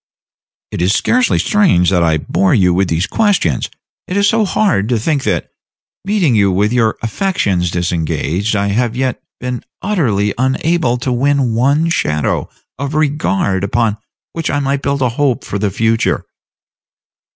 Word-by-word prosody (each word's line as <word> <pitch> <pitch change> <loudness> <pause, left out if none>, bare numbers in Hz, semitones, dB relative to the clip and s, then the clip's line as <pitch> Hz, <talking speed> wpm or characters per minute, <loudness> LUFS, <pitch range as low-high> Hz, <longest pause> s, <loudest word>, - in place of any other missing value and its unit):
"It - - -4
is 90 +3 +2
scarcely 250 +1 +2
strange 170 - +3
that 90 -2 +2
I 80 -2 +2
bore 95 +5 +1
you 90 -3 +3
with 95 +1 +1
these 85 +2 0
questions. 190 - 0 0.4
It 185 - -2
is 200 0 +3
so 220 0 +2
hard 185 - +1
to 120 - +2
think 140 +5 -1
that, - - -1 0.5
meeting 195 - +1
you 100 -3 +3
with 105 +5 +1
your 115 -3 +1
affections 105 - 0
disengaged, 85 +3 -1
I 100 0 0
have 115 +3 0
yet 130 0 -2 0.2
been 125 0 -4 0.2
utterly 115 - 0
unable 130 0 +1
to 125 +1 -3
win 135 -1 +1
one 140 +8 +2
shadow 75 - -1 0.3
of 140 +1 -3
regard 140 -11 0
upon 110 +1 0 0.4
which 165 -1 -3
I 145 - 0
might 140 0 -1
build 140 -1 -1
a 125 - +2
hope 130 0 0
for 100 - -4
the 105 0 0
future." 115 +3 0
120 Hz, 160 wpm, -15 LUFS, 100-145 Hz, 0.5 s, strange